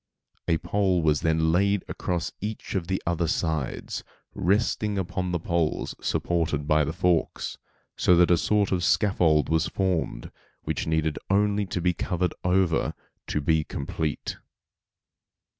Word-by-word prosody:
A 80 - +3
pole 95 -2 +1
was 75 -2 +2
then 80 0 +2
laid 100 +3 +2
across 85 -2 -2
each 105 +2 -5
of 90 -4 -2
the 95 0 0
other 85 0 0
sides, 80 -3 -2 0.3
resting 105 +1 +1
upon 90 -1 -2
the 85 - 0
poles 85 -1 -1
supported 80 -4 0
by 75 -1 +4
the 75 - -1
forks, 90 -1 0 0.4
so 90 - +4
that 90 +1 +5
a - - +7
sort 105 -2 +2
of 90 -2 +1
scaffold 85 -7 +3
was 80 +2 +1
formed, 85 -9 -2 0.3
which - - -2
needed 80 -1 0
only 100 +1 +2
to 90 - -3
be 90 +1 +2
covered 90 +1 -1
over 90 -2 +2 0.3
to 75 - -1
be 80 +1 +2
complete. 75 0 -4
85 Hz, 140 wpm, -26 LUFS, 80-95 Hz, 0.4 s, a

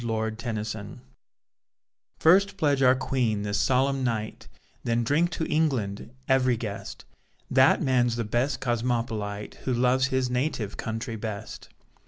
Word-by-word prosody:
HANDS 110 -1 -2
ALL 110 - -7
ROUND 105 +5 -10 1.2
First 195 +4 +4
pledge 145 -6 +2
our 130 -1 +6
Queen 120 -6 -1
this 100 -1 -1
solemn 135 +4 +2
night, 110 -3 -3 0.4
Then 120 0 +1
drink 150 +8 +2
to 160 - -2
England, 130 -13 -1 0.2
every 130 -2 +3
guest; 105 -3 -6 0.5
That - - +5
man's 125 -3 +2
the 120 - -1
best 120 +5 -1
Cosmopolite 115 -4 -2
Who 130 - +1
loves 125 +2 +3
his 130 -1 0
native 125 -4 -2
country 115 +1 -4
best. 105 -1 -7
120 Hz, 135 wpm, -26 LUFS, 110-130 Hz, 1.2 s, our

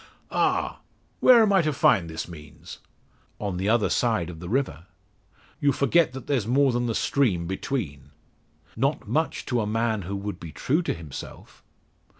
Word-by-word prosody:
"Ah! - - 0 0.4
where 240 -3 +7
am 205 -2 +3
I 190 - +5
to 155 -2 0
find 95 - +3
this 80 0 -5
means?" 75 0 -11 0.6
"On 100 -4 -3
the 95 +3 -1
other 115 -1 +3
side 110 -8 0
of 80 - -11
the 85 +1 -7
river." 100 - -1 0.7
"You 145 -2 +3
forget 150 +3 +3
that 130 -2 -8
there's 125 -8 0
more 135 +2 +3
than 120 0 -1
the 115 - -1
stream 105 -12 +1
between." 85 - -4 0.7
"Not 135 +6 -1
much 160 +1 -1
to 120 -2 0
a 105 - -2
man 110 0 0
who 95 +3 -5
would 100 -2 -5
be 85 - -8
true 150 - 0
to - - -2
himself." 80 -4 -10
110 Hz, 170 wpm, -25 LUFS, 85-135 Hz, 0.7 s, where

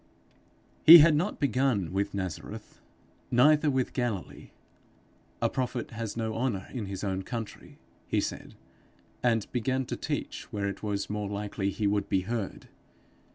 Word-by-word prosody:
He 165 +2 +12
had 160 0 +7
not 180 +8 -1
begun 125 - +1
with 100 +1 -1
Nazareth, 95 -5 -6 0.5
neither 150 +5 +5
with 130 -2 0
Galilee. 120 -7 -3 0.9
'A - - +3
prophet 125 -2 -3
has 115 -1 -5
no 110 -1 -2
honour 115 -5 -2
in 115 -6 -4
his 95 0 -6
own 95 -1 -1
country,' 115 +1 -7 0.3
he - - +1
said, - - -5 0.7
and 115 -4 +2
began 130 +2 -1
to - - -4
teach - - -5
where 100 -1 -2
it 100 - -5
was 100 -2 -2
more 105 -1 -3
likely 100 -1 -2
he 105 +1 -3
would 100 0 0
be 95 - +2
heard. 110 +1 -4
110 Hz, 150 wpm, -28 LUFS, 100-130 Hz, 0.9 s, He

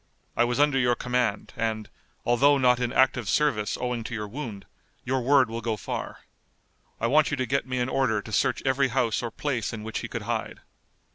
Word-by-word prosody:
I 120 - +3
was 120 +2 -1
under 145 -2 +4
your 125 -1 +3
command, 125 -5 -1
and, 110 -1 -2 0.4
although 140 +4 +4
not 125 -2 +4
in 120 -1 -1
active 130 -5 +2
service 110 -6 +1
owing 125 -2 -2
to 120 - -4
your 105 -1 -4
wound, 110 -4 -7 0.4
your 130 0 0
word 135 0 +4
will 115 +1 -5
go 110 -1 -2
far. - - -5 0.8
I - - -1
want 150 +5 +4
you 145 - -2
to 130 - 0
get 135 +1 -1
me 130 0 -2
an 125 0 0
order 130 -5 +1
to 110 - -9
search 105 - +1
every 135 +1 +3
house 120 -3 0
or 120 - -3
place 125 -1 -2
in 110 -2 -6
which 110 0 -4
he - - -5
could - - -5
hide." - - -3
125 Hz, 210 wpm, -26 LUFS, 115-130 Hz, 0.8 s, under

